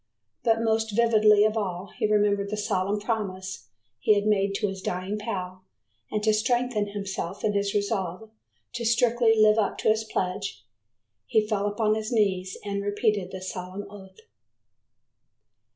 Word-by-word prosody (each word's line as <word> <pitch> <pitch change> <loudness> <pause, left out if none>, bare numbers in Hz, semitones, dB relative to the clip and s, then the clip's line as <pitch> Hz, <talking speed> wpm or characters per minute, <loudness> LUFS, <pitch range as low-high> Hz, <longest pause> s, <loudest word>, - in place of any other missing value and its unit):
But 225 -1 +2
most 220 -1 0
vividly 215 -2 +5
of 215 0 +1
all 190 -3 -3
he 215 - 0
remembered 205 -1 +2
the 210 - -3
solemn 205 0 0
promise 190 - -4 0.3
he 215 - +4
had 205 0 0
made 200 -2 +2
to 205 - 0
his 190 -1 -5
dying 185 +4 -3
pal 185 -4 -5 0.5
and 210 -1 -2
to 215 0 +4
strengthen 235 -1 +1
himself 195 -2 -5
in 210 - +1
his 200 0 0
resolve 200 0 -2 0.4
to 240 -1 -4
strictly 235 -1 +3
live 215 0 +5
up 205 - 0
to - - +1
his 220 0 +2
pledge, 180 - -3 0.6
he 215 - +2
fell 210 -2 0
upon 215 +1 +1
his 215 +1 -3
knees 190 -5 +1
and 200 0 -2
repeated 205 -2 0
the 190 -1 -7
solemn 185 +2 -6
oath. 195 -2 -13
205 Hz, 155 wpm, -26 LUFS, 195-220 Hz, 0.6 s, vividly